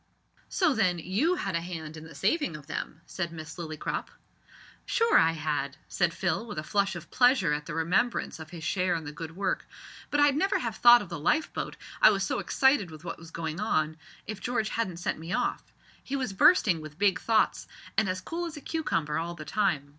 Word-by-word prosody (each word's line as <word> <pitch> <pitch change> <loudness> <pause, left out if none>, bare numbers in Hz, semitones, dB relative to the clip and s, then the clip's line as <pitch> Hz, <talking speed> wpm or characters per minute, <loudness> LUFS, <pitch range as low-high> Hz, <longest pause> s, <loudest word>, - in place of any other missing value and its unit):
"So, 360 -6 +2
then, 185 -7 +2
you 205 - +1
had 195 - -2
a 170 - 0
hand 160 -3 -6
in 160 0 -9
the 165 -2 -12
saving 190 - 0
of 150 - -14
them," 155 +1 -5
said 175 -3 -4
Miss 160 -1 -8
Lillycrop. 155 -3 -4 0.8
"Sure 460 -2 +2
I 165 0 +6
had," 150 -3 -2
said 175 -1 +1
Phil 175 +4 -1
with 210 - -7
a 155 - -2
flush 200 +2 0
of 170 - -9
pleasure 245 - +4
at 150 0 -3
the 160 - -4
remembrance 180 +6 0
of 160 -1 -9
his 170 -3 -9
share 180 +1 +1
in 165 - -3
the 145 - -6
good 165 +2 -8
work; 195 - -1 0.4
"but 290 - +1
I'd 290 -1 +5
never 385 +7 +2
have 230 -3 -3
thought 240 -2 +8
of 190 - -11
the 170 - -5
lifeboat, 300 - 0 0.2
I - - +9
was 195 -2 +1
so 190 - -1
excited 265 -8 +3
with 155 0 -11
what - - -5
was 165 0 -11
going 160 0 -4
on, 155 -7 +1 0.3
if 215 -1 -5
George 230 -3 -1
hadn't 190 -7 -2
sent 175 - -2
me 165 +3 -5
off. - - -1 0.3
He 275 - -3
was 255 -7 -2
bursting 190 - +5
with 155 -1 -10
big 200 -2 +3
thoughts, 225 -1 +1 0.3
and 215 -3 +2
as 185 0 -2
cool 345 +1 -4
as 320 -2 -8
a - - -8
cucumber 165 - -1
all 170 +1 -4
the 155 -2 -8
time. 165 -8 0
180 Hz, 215 wpm, -28 LUFS, 160-225 Hz, 0.8 s, I